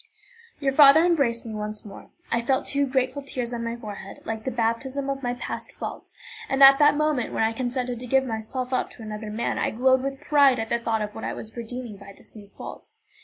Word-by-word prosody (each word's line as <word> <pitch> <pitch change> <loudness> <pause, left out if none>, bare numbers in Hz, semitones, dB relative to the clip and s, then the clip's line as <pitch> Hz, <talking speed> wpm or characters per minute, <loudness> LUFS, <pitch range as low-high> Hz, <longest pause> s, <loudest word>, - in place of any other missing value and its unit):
Your 275 -2 +1
father 290 +3 +7
embraced 275 -10 +1
me 225 - -6
once 210 0 -5
more. 200 -2 -11 0.2
I 235 - +2
felt 260 +3 0
two 280 0 0
grateful 260 +1 0
tears 250 -3 -4
on 235 -1 -3
my 230 0 -3
forehead, 205 -4 -8
like 220 -1 -4
the - - 0
baptism 260 +4 -1
of 275 0 -4
my 245 -2 -2
past 245 - -6
faults, - - -7 0.3
and 270 0 +4
at 275 0 +9
the 295 0 +7
moment 300 -5 0
when - - +1
I 220 0 +1
consented 245 0 -3
to 250 - -7
give 265 +2 +3
myself 250 +3 -4
up - - 0
to 230 - -12
another 215 0 -6
man 220 +3 -2
I - - +1
glowed 260 +3 +3
with 275 0 -4
pride 285 -3 +4
at 225 0 -3
the 235 - +1
thought 225 -2 -1
of 210 0 -6
what 220 - -8
I - - -2
was 220 - -8
redeeming 235 -2 -6
by 200 0 -12
this - - -13
new 205 -2 -12
fault. - - -10
245 Hz, 230 wpm, -25 LUFS, 225-270 Hz, 0.3 s, at